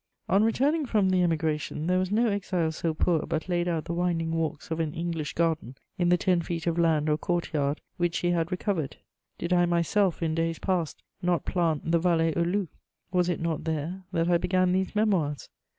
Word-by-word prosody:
On 195 Hz, +2 st, +4 dB
returning 280 Hz, +7 st, +2 dB
from 210 Hz, -5 st, +2 dB
the 185 Hz, -1 st, +3 dB
Emigration, 160 Hz, -2 st, -1 dB
there 180 Hz, +1 st, +2 dB
was 185 Hz, 0 st, -1 dB
no 220 Hz, +4 st, +2 dB
exile 185 Hz, -6 st, 0 dB
so 160 Hz, +1 st, -1 dB
poor 160 Hz, 0 st, +1 dB
but 160 Hz, -, -2 dB
laid 175 Hz, -1 st, 0 dB
out 165 Hz, -3 st, -1 dB
the 170 Hz, -, -3 dB
winding 170 Hz, -2 st, 0 dB
walks 160 Hz, -2 st, -3 dB
of 160 Hz, -, -1 dB
an 160 Hz, -2 st, -2 dB
English 165 Hz, -3 st, -3 dB
garden 160 Hz, -7 st, 0 dB, 0.2 s
in 175 Hz, -1 st, +3 dB
the 180 Hz, -, +5 dB
ten 180 Hz, -1 st, +2 dB
feet 165 Hz, 0 st, -4 dB
of 170 Hz, 0 st, 0 dB
land 160 Hz, -3 st, +2 dB
or 150 Hz, 0 st, +1 dB
court 175 Hz, 0 st, -2 dB
yard 145 Hz, 0 st, 0 dB, 0.2 s
which 175 Hz, -1 st, 0 dB
he 175 Hz, -, +1 dB
had 170 Hz, 0 st, 0 dB
recovered: 180 Hz, -5 st, -2 dB, 0.4 s
did 170 Hz, +1 st, -1 dB
I 175 Hz, 0 st, +4 dB
myself, 175 Hz, +2 st, +1 dB
in 160 Hz, -1 st, 0 dB
days 165 Hz, 0 st, 0 dB
past, 180 Hz, -5 st, -2 dB, 0.2 s
not 175 Hz, -1 st, +1 dB
plant 165 Hz, -3 st, 0 dB
the 170 Hz, -, +4 dB
Vallée 165 Hz, -2 st, +2 dB
aux 170 Hz, -, +1 dB
Loups? 175 Hz, 0 st, -1 dB, 0.4 s
Was 180 Hz, -1 st, +2 dB
it 175 Hz, -, -1 dB
not 165 Hz, -2 st, -2 dB
there 160 Hz, +4 st, -3 dB
that 170 Hz, -2 st, +1 dB
I 175 Hz, -1 st, +3 dB
began 185 Hz, 0 st, +2 dB
these 190 Hz, +2 st, -1 dB
Memoirs? 185 Hz, -9 st, +1 dB
170 Hz, 210 wpm, -27 LUFS, 160-180 Hz, 0.4 s, the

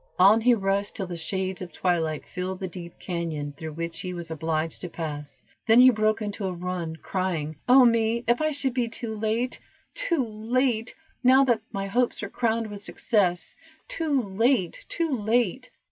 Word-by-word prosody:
On 200 Hz, +5 st, +6 dB
he 245 Hz, +1 st, +5 dB
rushed 200 Hz, 0 st, -1 dB
till 195 Hz, -, -3 dB
the 175 Hz, -1 st, -6 dB
shades 185 Hz, +3 st, -3 dB
of 180 Hz, -2 st, -6 dB
twilight 160 Hz, -3 st, -1 dB
filled 185 Hz, 0 st, -4 dB
the 190 Hz, -, -3 dB
deep 175 Hz, -1 st, -9 dB
cañon, 160 Hz, -5 st, -4 dB
through 160 Hz, 0 st, -7 dB
which 170 Hz, +1 st, -4 dB
he 180 Hz, -1 st, -4 dB
was 170 Hz, -1 st, -5 dB
obliged 160 Hz, 0 st, -2 dB
to 180 Hz, -, -5 dB
pass, 145 Hz, -5 st, -6 dB, 0.2 s
then 225 Hz, +2 st, +7 dB
he 255 Hz, +1 st, +9 dB
broke 215 Hz, -1 st, +1 dB
into 205 Hz, -1 st, -3 dB
a -, -, -2 dB
run, 175 Hz, -2 st, -4 dB
crying, 165 Hz, -3 st, -2 dB
"Oh 255 Hz, 0 st, +8 dB
me! 230 Hz, 0 st, +2 dB
if 240 Hz, +5 st, +3 dB
I 310 Hz, -, +2 dB
should 275 Hz, -3 st, -1 dB
be 245 Hz, -2 st, 0 dB
too 225 Hz, -1 st, -5 dB
late! 225 Hz, +4 st, -1 dB, 0.3 s
too 340 Hz, -, 0 dB
late! 230 Hz, +2 st, -1 dB, 0.3 s
now 260 Hz, +2 st, +7 dB
that 240 Hz, -5 st, +2 dB
my 195 Hz, 0 st, -3 dB
hopes 240 Hz, +3 st, 0 dB
are 205 Hz, -, -4 dB
crowned 230 Hz, 0 st, 0 dB
with 205 Hz, -1 st, -7 dB
success. 195 Hz, -4 st, 0 dB, 0.3 s
Too 305 Hz, -4 st, 0 dB
late! 205 Hz, -1 st, +1 dB
too 330 Hz, -5 st, 0 dB
late!" 235 Hz, +2 st, 0 dB
205 Hz, 180 wpm, -26 LUFS, 175-235 Hz, 0.3 s, he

